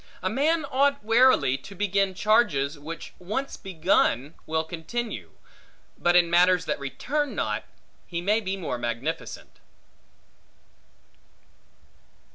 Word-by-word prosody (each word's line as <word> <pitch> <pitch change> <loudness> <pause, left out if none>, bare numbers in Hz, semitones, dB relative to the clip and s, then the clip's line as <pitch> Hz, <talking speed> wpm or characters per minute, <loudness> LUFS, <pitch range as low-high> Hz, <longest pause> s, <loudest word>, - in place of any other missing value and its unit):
A 185 - 0
man 300 +6 +1
ought 280 0 +1
warily 225 - +4
to 195 +8 -12
begin 195 -1 +1
charges 170 -10 +2
which 160 +2 -8
once 215 +10 -3
begun 165 - +1
will 160 0 0
continue; 180 +9 -5 0.6
but 175 0 +2
in 175 -1 +6
matters 180 +1 +4
that 150 - -2
return 280 - -2
not, - - -2 0.4
he 170 - -3
may 205 +5 +2
be 195 -1 -3
more 155 -9 -4
magnificent. 120 +8 -4
185 Hz, 110 wpm, -26 LUFS, 160-225 Hz, 0.6 s, in